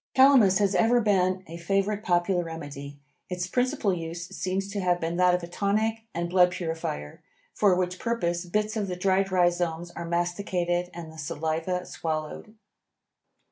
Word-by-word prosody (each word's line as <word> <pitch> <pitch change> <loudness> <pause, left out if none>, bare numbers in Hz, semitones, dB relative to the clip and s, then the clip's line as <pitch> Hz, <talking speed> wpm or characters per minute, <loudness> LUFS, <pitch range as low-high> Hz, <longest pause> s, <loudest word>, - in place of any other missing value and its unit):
Calamus 260 -8 +6
has 200 -1 +2
ever 235 +4 +4
been 185 -4 +2
a 165 +1 -8
favorite 195 +4 0
popular 175 0 +2
remedy. 145 -4 -7 0.3
Its 180 -1 -2
principal 245 0 0
use 170 0 -5
seems 190 +1 -2
to 205 - -3
have 180 -2 +1
been 165 +1 -2
that 180 0 +5
of 180 - -4
a - - -5
tonic 215 +5 0
and 170 -1 -2
blood 180 0 +5
purifier, 160 - -4 0.3
for 200 -3 +4
which 180 0 -1
purpose 175 -7 -1
bits 210 +4 -1
of 210 -2 -1
the 180 - -3
dried 190 +1 +1
rhizomes 175 -2 +1
are 170 -1 -6
masticated 175 0 -1
and 170 -2 -8
the 160 - -11
saliva 160 +3 -2
swallowed. 155 +6 -5
180 Hz, 160 wpm, -27 LUFS, 170-195 Hz, 0.3 s, Calamus